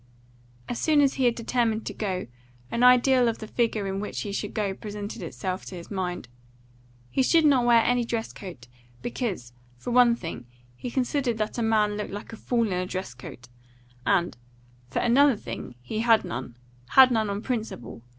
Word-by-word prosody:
As 240 - -3
soon 310 -2 +3
as 275 -2 +4
he 265 - 0
had 240 -1 +3
determined 230 -2 0
to - - -4
go, 190 -4 -3 0.5
an 235 - -1
ideal 250 0 +6
of 230 - 0
the - - -7
figure 220 -2 0
in 195 0 -2
which 210 - -4
he 205 - -4
should 205 +1 -4
go 205 -3 0
presented 205 +1 -7
itself 185 -1 -4
to 185 - -8
his 170 +2 -10
mind. 180 - -3 0.8
He - - +2
should 320 +4 +4
not 265 -5 +4
wear 235 -1 +6
any 245 0 +2
dress 230 -1 -3
coat, 170 - -10 0.4
because, 200 - -3 0.2
for 185 - -5
one 240 -1 +6
thing, 165 - -7 0.3
he 245 - -6
considered 255 -1 0
that 215 +2 -2
a - - 0
man 215 -2 +2
looked 210 - -4
like 205 +3 -7
a - - -5
fool 235 +1 0
in 200 - -2
a 180 0 -1
dress 185 -8 -4
coat, 125 0 -11 0.6
and, 180 0 +1 0.5
for - - -5
another 270 +3 +5
thing, 125 -10 -7
he 215 - -4
had 225 -1 +4
none 120 0 -6 0.4
had 260 -1 +9
none 220 -3 +1
on 200 +2 -3
principle. 220 - -4
220 Hz, 190 wpm, -26 LUFS, 190-245 Hz, 0.8 s, had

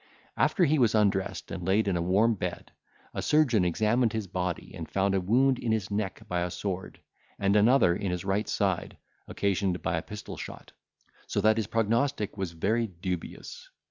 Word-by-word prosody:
After 195 -6 +3
he 155 0 +2
was 115 -3 +3
undressed, 95 -3 0
and 90 - -5
laid 100 +4 +2
in 95 - +1
a 85 - 0
warm 100 +7 +3
bed, 90 -4 -5 0.4
a - - -3
surgeon 135 -10 +3
examined 110 +6 +2
his 110 -2 -2
body, 90 -2 -4
and - - -7
found 95 0 +1
a 95 - +1
wound 125 +7 +3
in 115 - -1
his 110 -3 -1
neck 100 0 -3
by 90 -3 -1
a 90 - -1
sword, 95 +1 -5 0.4
and 100 +1 +2
another 105 -4 +5
in 100 0 -2
his 90 0 -3
right 100 +2 0
side, - - -1 0.3
occasioned 100 -2 -1
by 80 - 0
a - - -1
pistol 105 +4 -8
shot; - - -9 0.6
so - - -1
that 110 +2 +4
his 110 -3 -1
prognostic 115 0 0
was 95 -4 -4
very 110 +8 0
dubious. 90 -2 -6
100 Hz, 185 wpm, -28 LUFS, 90-110 Hz, 0.6 s, another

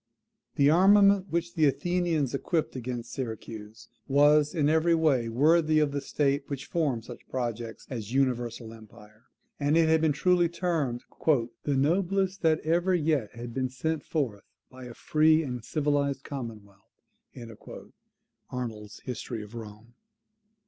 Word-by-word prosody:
The 140 - +4
armament 200 +2 +5
which 170 +1 -1
the 155 - +3
Athenians 160 -1 0
equipped 160 +3 -1
against 120 -1 -5
Syracuse 110 -3 -7 0.2
was 145 +3 +4
in 150 -3 +2
every 160 +2 +3
way 140 -8 +2
worthy 155 +6 +3
of 150 -2 +2
the 140 0 -3
state 140 0 0
which 140 -2 -5
formed 140 -9 -1
such 120 - -12
projects 120 -3 -4
of 125 - -5
universal 120 -2 -1
empire; 110 0 -16 0.3
and 145 +2 +2
it 165 -1 +4
has 160 0 +4
been 160 -1 +3
truly 175 +3 +2
termed 160 -9 -2 0.2
"the 135 0 +1
noblest 190 +6 +1
that 160 -2 +2
ever 175 +4 +1
yet 150 -9 0
had 120 0 -7
been 130 0 -1
sent 150 +4 -3
forth 125 -11 -3 0.3
by 130 -1 -11
a 120 -1 -10
free 155 +1 +3
and 125 -5 -5
civilized 140 0 -1
commonwealth." 110 -7 -8 1.7
[Arnold's 110 -4 -6
History 120 -2 -5
of 105 +2 -13
Rome. 110 0 -10
140 Hz, 140 wpm, -28 LUFS, 120-160 Hz, 1.7 s, armament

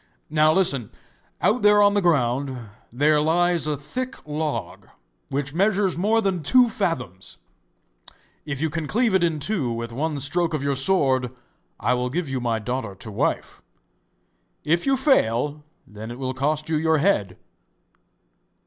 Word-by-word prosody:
Now, 155 0 +4
listen; 140 - +1 0.5
out 235 +4 +2
there 210 0 +5
on 205 0 +5
the 205 - +2
ground, 135 -5 +1 0.3
there 150 +5 +2
lies 170 +1 +2
a 150 -1 -1
thick 250 - -5
log, 150 0 -4 0.4
which 140 0 -3
measures 195 +1 +1
more 215 +6 +2
than 190 -4 -1
two 245 - +4
fathoms; 125 - -4 1.1
if 145 -2 -5
you 160 -1 0
can 160 -1 -3
cleave 230 - +1
it 190 -2 +3
in 165 -2 +1
two 150 - -1
with 115 0 -5
one 150 +3 -2
stroke 165 +4 +1
of 145 - -3
your 140 -1 0
sword, 135 -5 +2 0.5
I 125 - +1
will 125 0 -1
give 165 +4 -2
you 135 -1 -3
my 115 -2 0
daughter 110 -2 -4
to 110 +3 -9
wife. 100 - -2 1.0
If 170 - 0
you 270 0 +3
fail, 150 - +1 0.2
then 105 +2 -9
it 120 - -7
will 130 -1 -3
cost 150 +3 -1
you 160 -1 0
your 160 +1 +2
head. 140 - +1
150 Hz, 160 wpm, -23 LUFS, 130-180 Hz, 1.1 s, there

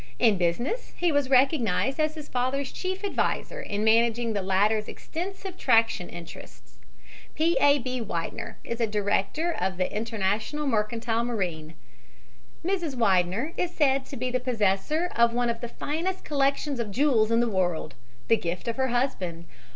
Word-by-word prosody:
In 220 -6 +4
business 235 - -1
he 350 -1 +2
was 285 -3 +1
recognized 265 - +3
as 310 0 +1
his 305 -2 -8
father's 260 +2 -1
chief 375 +1 -4
adviser - - -1
in 205 - -3
managing 230 +1 +3
the 200 - -1
latter's 205 +3 +2
extensive 375 +2 -6
traction 225 -6 +3
interests. 160 - -11 0.6
P. 330 +2 +2
A. 285 0 +6
B. 255 -1 -3
Widener 170 -7 -4
is 235 0 -4
a 230 - +3
director 210 - 0
of 185 - -2
the 185 +2 -1
International 220 +6 -1
Mercantile 230 -1 0
Marine. 175 -9 -3 0.9
Mrs. 350 -7 -1
Widener 200 - +2
is 355 - -2
said 275 -3 +2
to 275 - -7
be 250 +1 -2
the 255 - +1
possessor 250 - 0
of 235 0 +4
one 240 -1 +2
of 230 - -7
the 240 - -3
finest 335 +9 -3
collections 280 -1 0
of 230 -3 -2
jewels 230 -1 +3
in 230 0 +3
the 240 - +2
world, 180 -6 -1 0.3
the 225 - +5
gift 175 +4 -4
of 230 - -2
her 265 0 +2
husband. 195 -10 -1
235 Hz, 160 wpm, -27 LUFS, 205-285 Hz, 0.9 s, A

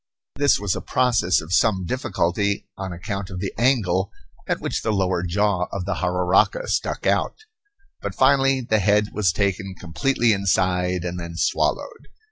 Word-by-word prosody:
This 145 0 +3
was 100 -3 -1
a - - -4
process 120 -8 +2
of 80 +2 -6
some 95 -2 +2
difficulty 100 -3 -1
on 95 -1 -5
account 100 +2 -5
of 90 -2 -6
the 95 0 -4
angle 110 -7 +1 0.4
at - - -1
which - - -3
the 110 - -1
lower 95 -3 0
jaw 90 +1 0
of 95 -2 -4
the 100 - -1
jararaca 90 - +1
stuck - - -2
out. - - +1 0.7
But 100 -2 -5
finally 135 0 +3
the 110 -3 +1
head 105 +1 +2
was 100 -6 +2
taken 95 0 -2
completely 110 +8 +1
inside 90 -2 0
and 90 0 -4
then 85 -1 -7
swallowed. - - -1
95 Hz, 160 wpm, -22 LUFS, 90-110 Hz, 0.7 s, This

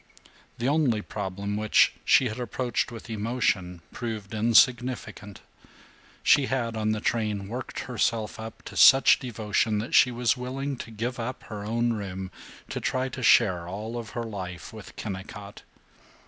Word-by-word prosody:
The 120 - -1
only 135 -8 +2
problem 100 0 -4
which 110 0 +4
she 130 - +5
had 115 +1 -5
approached 120 +1 -2
with 115 -2 -9
emotion 105 -6 -1
proved 110 -4 -5
insignificant. 115 -2 +2 0.8
She 140 -2 +5
had, 120 -4 -1
on 110 0 0
the 110 - -1
train, 105 -3 -1
worked 120 +4 -5
herself 115 -4 -1
up 110 0 -8
to - - -10
such 135 0 +7
devotion 110 -3 -1
that 110 +3 -4
she 125 - +7
was 120 -1 +1
willing 135 +3 -4
to 115 - -8
give 115 +3 -4
up 120 +2 -5
her 105 -2 -7
own 115 +2 0
room, 95 -3 -5 0.4
to - - -3
try 130 +1 -1
to 130 - -7
share 95 -8 +4
all 105 +6 -5
of 115 -2 -5
her 120 - -1
life 95 -7 -7
with 110 -2 -11
Kennicott. 100 0 -7
110 Hz, 155 wpm, -27 LUFS, 105-120 Hz, 0.8 s, such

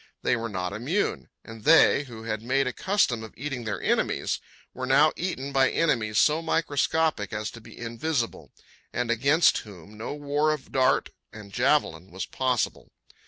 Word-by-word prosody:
They - - +2
were 115 -1 -4
not 95 -2 -3
immune. 140 - -2 0.2
And 115 -1 -11
they, 155 -2 +6
who 115 -4 -10
had 110 -1 -3
made 135 +4 +1
a 125 - -2
custom 190 - +1
of 110 - -11
eating 130 -3 -4
their 110 - -3
enemies, - - 0 0.3
were 130 0 -5
now 145 +4 +5
eaten 140 -6 -3
by 135 -1 +4
enemies 115 -10 0
so 155 +6 +4
microscopic 160 - 0
as 110 -1 -3
to 115 - -12
be - - -14
invisible, 120 +2 -3 0.4
and 125 -1 -1
against 140 +8 +4
whom 105 +1 -13
no 115 - -4
war 145 +1 +1
of 150 -3 -8
dart 130 -1 +2 0.2
and 105 -2 -12
javelin 120 - +1
was 95 0 -5
possible. 130 -4 -1
125 Hz, 165 wpm, -26 LUFS, 110-150 Hz, 0.4 s, they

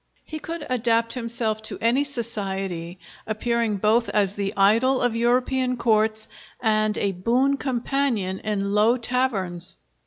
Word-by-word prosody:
He 310 - -6
could 330 0 -6
adapt 230 -2 +1
himself 230 -3 -2
to 220 - -4
any 240 +5 +2
society, 195 -9 -3 0.3
appearing 225 0 0
both 220 +4 +2
as 200 -2 +1
the 200 -1 -2
idol 230 +7 +4
of 245 -2 +1
European 250 +2 +1
courts 220 -1 +2 0.3
and 215 -2 +1
a 200 - 0
boon 245 +9 +1
companion 250 -7 -1
in 200 -2 -2
low 220 +4 +4
taverns. 195 -8 -1
230 Hz, 130 wpm, -24 LUFS, 205-250 Hz, 0.3 s, idol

